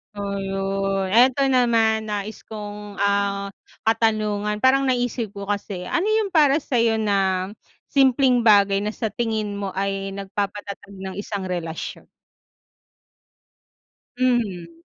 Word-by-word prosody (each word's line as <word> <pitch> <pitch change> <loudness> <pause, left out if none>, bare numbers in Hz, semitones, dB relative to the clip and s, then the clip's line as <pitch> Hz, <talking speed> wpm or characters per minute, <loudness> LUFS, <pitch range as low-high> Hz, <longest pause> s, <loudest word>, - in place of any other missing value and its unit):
Oh 200 -1 -3
yun, 195 0 -1
eto 255 +4 +5
naman 225 -3 +3
nais 210 +1 -4
kong 210 -1 -7
ah, 200 0 0 0.3
katanungan 215 -2 +1
parang 270 +1 +4
naisip 245 -4 -1
ko 200 - -6
kasi, 200 -3 -3
ano 345 - -1
yung 435 -2 +1
para 295 -2 +4
sayo 230 -3 +2
na, 195 -3 0 0.4
simpleng 265 -2 +4
bagay 200 -2 +5
na 210 +1 -2
sa 220 - -2
tingin 215 -3 -2
mo 200 -1 -3
ay 195 0 -2
nagpapatatag 200 0 -5
ng 190 0 -7
isang 200 -1 -4
relasyon? 170 -3 -5 2.1
Mhm. 200 -10 -1
205 Hz, 115 wpm, -23 LUFS, 195-235 Hz, 2.1 s, eto